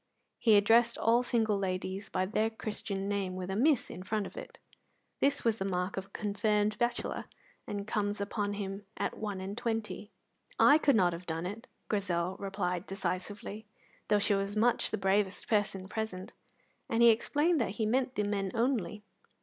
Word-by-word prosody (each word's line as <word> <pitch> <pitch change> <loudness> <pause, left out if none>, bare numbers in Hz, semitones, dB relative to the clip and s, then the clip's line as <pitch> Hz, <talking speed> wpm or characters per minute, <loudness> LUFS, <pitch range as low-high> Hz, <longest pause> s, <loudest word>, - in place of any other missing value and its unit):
He 220 -3 +5
addressed 230 +3 +4
all 230 +2 +4
single 225 -4 +1
ladies 190 +1 -3
by 185 0 0
their 215 +3 +1
Christian 210 -3 -4
name 200 -2 -1
with 185 0 -4
a - - -1
Miss 275 +4 +3
in 185 - -7
front 205 +2 -1
of - - -9
it. - - -9 0.6
This 280 -2 +1
is 225 -1 +2
the - - 0
mark 180 0 -1
of 195 - -4
the - - -23
confirmed 210 +1 0
bachelor, 240 0 -1 0.4
and 200 -1 -4
comes 205 -1 -1
upon 205 0 -2
him 200 0 -5
at - - -2
one 205 -3 -3
and 190 +2 -5
twenty. 225 -2 -3 0.5
"I 295 +2 +7
could 280 -4 +4
not 180 -5 +4
have 170 +2 -8
done 165 +1 -2
it," 205 +5 -6 0.2
Grizel 185 -3 0
replied 195 -2 -2
decisively, 200 +2 -4 0.4
though 210 - +4
she 205 0 +2
was 195 +1 -1
much 235 +3 +2
the - - -1
bravest 195 0 +1
person 205 -3 0
present, 200 -3 -4 0.6
and 230 +1 +3
he 235 - +9
explained 295 +7 +2
that 215 - -1
he 220 - +1
meant 255 +3 +1
the 210 - +1
men 200 -1 -1
only. 225 -5 0
205 Hz, 180 wpm, -31 LUFS, 195-225 Hz, 0.6 s, he